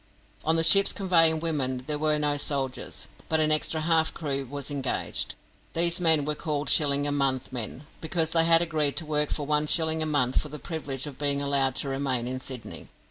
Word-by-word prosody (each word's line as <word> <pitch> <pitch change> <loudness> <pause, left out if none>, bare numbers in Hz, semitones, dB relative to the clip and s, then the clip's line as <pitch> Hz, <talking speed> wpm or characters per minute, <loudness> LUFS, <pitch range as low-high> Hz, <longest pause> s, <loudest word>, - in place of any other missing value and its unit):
On 160 - +1
the 165 - +2
ships 195 +5 +6
conveying 165 -5 +3
women 130 -6 -2
there 150 0 -2
were 155 0 +2
no 150 -1 +1
soldiers, 140 -3 -3 0.2
but 160 - +2
an 155 0 +2
extra 155 +1 +1
half 160 0 +2
crew 140 -4 -3
was 140 0 -5
engaged. 135 -2 -3 0.4
These 170 +1 0
men 160 -4 +5
were 150 - -1
called 150 -2 -2
"Shilling 145 -1 +2
a 145 - -1
month" 135 -2 -1
men, 125 +4 -4 0.2
because 160 0 -1
they 165 -1 +3
had 165 0 +6
agreed 155 -4 +1
to 170 - +2
work 150 -1 0
for 145 - -3
one 150 +1 +1
shilling 160 0 +1
a 155 - -1
month 135 -4 +1
for 150 - -7
the 150 - -7
privilege 145 -4 -5
of 145 -3 -10
being 140 -1 0
allowed 140 -2 0
to 140 - -2
remain 135 -3 -2
in 130 +1 -4
Sydney. 130 -2 -8
150 Hz, 205 wpm, -25 LUFS, 140-160 Hz, 0.4 s, ships